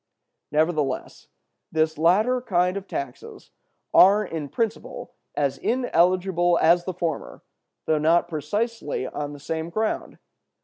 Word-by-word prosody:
"Nevertheless, 150 -3 -1 0.4
this 160 0 +1
latter 210 +11 +3
kind 180 -5 +1
of 200 -1 -5
taxes 135 -3 -7 0.4
are 205 +3 +6
in 160 -5 -5
principle 225 - -4 0.2
as 140 -2 0
ineligible 180 -6 +2
as 175 +2 +4
the 185 - -3
former, 170 -4 -4 0.4
though 155 -1 +2
not 165 +3 +3
precisely 175 - -3
on 145 +2 -5
the 145 - -10
same 160 +3 -4
ground. 215 +5 -2
170 Hz, 120 wpm, -24 LUFS, 155-195 Hz, 0.4 s, are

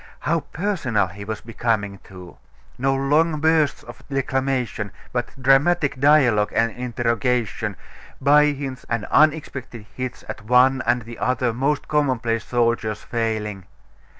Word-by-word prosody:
How 165 +2 +1
personal 155 - -1
he 100 +2 -9
was 110 +1 -5
becoming, 110 -4 -2
too!... 90 -2 -13 0.4
No 135 +1 +1
long 150 +4 +2
bursts 160 -1 +2
of - - -12
declamation, 130 -5 -1 0.2
but 120 0 -1
dramatic 140 +2 +3
dialogue 130 -8 +4
and 115 0 +2
interrogation, 120 -1 -1 0.4
by 145 +2 +5
hints, 140 -3 -4
and 115 -3 -1
unexpected 140 -7 +1
hits 130 -1 -5
at - - -6
one 130 +3 +4
and 120 -1 +2
the 115 +1 -10
other 125 -2 0
most 140 +5 -1
commonplace 125 -6 0
soldier's 115 -3 0
failing.... 110 -4 -3
125 Hz, 125 wpm, -22 LUFS, 115-140 Hz, 0.4 s, by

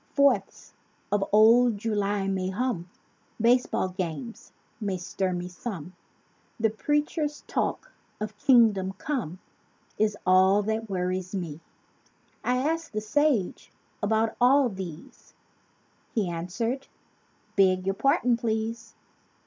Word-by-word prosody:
Fourths 280 -1 +2 0.4
of 205 -1 +2
old 225 +2 +6
July 205 -2 -1
may 190 -1 -1
hum, 190 -4 -2 0.5
(Baseball 235 -4 +2
games 185 +6 -5 0.3
may 200 -4 -2
stir 185 +1 -2
me 180 0 -3
some—) 180 - -7 0.7
The 225 -1 +2
preacher's 295 +5 -1
talk - - -2 0.3
of 215 0 -4
Kingdom 210 -6 +4
Come 200 - -3 0.6
Is 210 -1 +2
all 190 +2 +5
that 220 +1 -2
worries 185 0 -2
me. 165 -5 -4 0.8
I 250 0 +1
asked 325 +4 -1
the 215 - 0
sage 220 -1 0 0.3
about 220 +2 +1
all 260 +1 +5
these: 185 -6 -9 0.8
He 210 -5 +1
answered, 195 +10 -3 0.7
"Beg 185 -1 +3
your 195 - +1
pardon, 245 +1 +2
please! 225 0 -3
210 Hz, 110 wpm, -27 LUFS, 185-240 Hz, 0.8 s, old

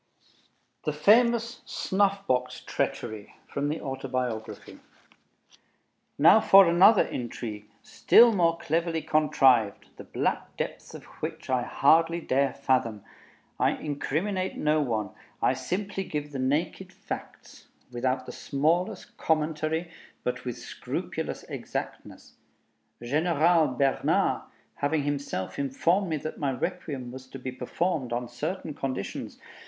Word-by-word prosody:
THE 150 - 0
FAMOUS 235 +7 +3
"SNUFF 200 0 0
BOX 125 0 -1
TREACHERY" 110 -1 -4
From 140 +1 -2
the 155 - -2
Autobiography 130 -5 -4 1.4
Now 165 +9 +7
for 195 -1 +8
another 185 +5 +6
intrigue, 110 -3 -6
still 235 0 +5
more 170 -4 +2
cleverly 165 0 -1
contrived, 130 -8 +3
the - - -9
black - - -2
depths - - -5
of - - -10 0.2
which - - -5
I 130 -1 +2
hardly 165 +6 +3
dare 140 -3 +1
fathom. 125 -6 0 0.6
I - - +3
incriminate 175 +6 -2
no 150 0 +2
one; 110 -7 -2 0.3
I - - +3
simply 195 +9 -3
give 150 -4 -5
the 135 - -5
naked 155 +8 -1
facts, - - -9 0.2
without 130 +1 -1
the - - -7
smallest 160 +6 -1
commentary, 160 +1 -1 0.3
but 125 0 -3
with 125 -1 -4
scrupulous 120 - -5
exactness. - - -7 0.7
General 160 +4 +3
Bernard 135 +1 +1 0.4
having 145 +1 0
himself 140 -10 -3
informed 170 +8 +1
me 155 - 0
that 155 +2 -6
my 140 -2 0
Requiem 130 -2 -4
was 130 +1 -10
to 135 - -9
be 130 0 -5
performed 130 +2 -2
on 120 0 -2
certain 150 +7 -4
conditions 130 -8 -5
145 Hz, 120 wpm, -27 LUFS, 130-170 Hz, 1.4 s, for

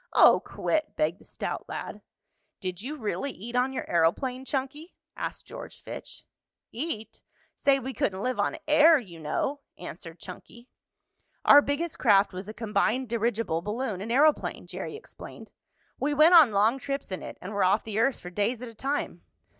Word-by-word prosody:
"Oh, - - +7
quit!" 310 -1 -2
begged 160 +4 0
the - - -18
stout - - -5
lad. - - -6 0.6
"Did 185 -1 -4
you 275 +7 -5
really 255 +3 -2
eat 235 0 -8
on 250 +2 +2
your 265 - -4
aeroplane, 250 - +1
Chunky?" 285 +5 -4 0.2
asked - - -5
George - - -10
Fitch. - - -9 0.5
"Eat? 235 -4 -4 0.3
Say, 275 -1 +3
we 265 0 -5
couldn't 190 -5 -1
live 255 +2 -1
on - - 0
air 305 +2 +7
you 185 - -9
know," 265 - -2 0.2
answered 170 -1 -9
Chunky. 235 +6 -11 0.8
"Our 290 - +9
biggest 305 +4 -2
craft 200 -4 +4
was 190 +3 -7
a - - -3
combined 225 +2 0
dirigible 225 -7 0
balloon 210 0 -3
and 220 +3 -4
aeroplane," 295 +4 +2
Jerry - - -6
explained. 440 - -11 0.5
"We 290 +1 0
went 310 +4 +7
on 320 -7 +9
long 215 +6 +3
trips 275 -3 -4
in 185 - -4
it, - - -8
and 190 +4 -7
were 200 -1 +1
off 195 +4 +3
the 220 -1 -3
earth 250 +3 +2
for 180 - -9
days 220 +6 -1
at 245 - -6
a - - -13
time." 275 +6 -3
235 Hz, 175 wpm, -27 LUFS, 200-275 Hz, 0.8 s, Our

